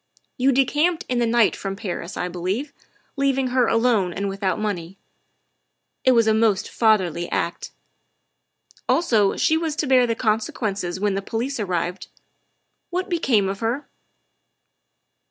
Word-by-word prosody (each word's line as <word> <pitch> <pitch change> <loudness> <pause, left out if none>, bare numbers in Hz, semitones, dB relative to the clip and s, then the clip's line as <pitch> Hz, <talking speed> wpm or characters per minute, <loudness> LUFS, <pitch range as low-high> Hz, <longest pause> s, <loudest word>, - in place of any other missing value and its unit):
You 265 +2 +3
decamped 300 +6 +1
in 250 -1 0
the 235 - +2
night 230 -1 +3
from 195 -1 -5
Paris, 185 -2 -5
I 180 - -2
believe, 185 - -3 0.4
leaving 270 -2 +1
her 250 -1 +2
alone 225 -6 +2
and 200 +3 -3
without 195 -1 -1
money; 195 -4 -4 1.1
it 260 - +5
was 230 -2 +4
a 220 - +3
most 220 -3 +2
fatherly 185 -7 +1
act. - - -2 1.2
Also 225 - +2
she 315 - +3
was 320 -2 -2
to 305 - -1
bear 255 -2 +4
the 230 - 0
conse 220 -2 0
quences 195 -5 -3
when 205 0 +1
the 195 - -2
police 235 +6 -3
appeared. 180 -2 -2 0.8
What 365 +1 -3
became 245 - +2
of 195 +1 -4
her?" 235 +6 -3
225 Hz, 145 wpm, -22 LUFS, 195-260 Hz, 1.2 s, it